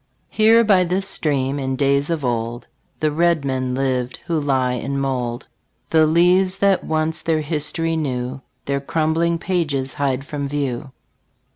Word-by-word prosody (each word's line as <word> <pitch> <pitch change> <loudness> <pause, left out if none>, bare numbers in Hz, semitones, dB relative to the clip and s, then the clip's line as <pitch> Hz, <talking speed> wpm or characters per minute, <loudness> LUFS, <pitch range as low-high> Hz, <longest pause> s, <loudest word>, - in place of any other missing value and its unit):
Here 225 +2 +5
by 195 -4 +4
this 185 +2 0
stream, 145 -6 0
in 130 -1 -2
days 140 +2 +1
of 160 -5 -1
old 120 0 -2 0.4
The 155 -1 +2
red 165 -1 +2
men 130 -1 -1
lived, 130 -2 -1
who 170 -2 0
lie 130 -3 +1
in 135 +3 -3
mould; 125 -2 -2 0.5
The 160 -1 +5
leaves 180 +4 +3
that 195 -1 +2
once 160 +1 -1
their 160 -1 0
history 155 +2 -1
knew 130 -3 -3 0.2
Their 140 0 -1
crumbling 165 +3 0
pages 150 -7 -1
hide 135 -1 -1
from 140 -1 -4
view. 140 -1 -3
145 Hz, 150 wpm, -20 LUFS, 130-165 Hz, 0.5 s, Here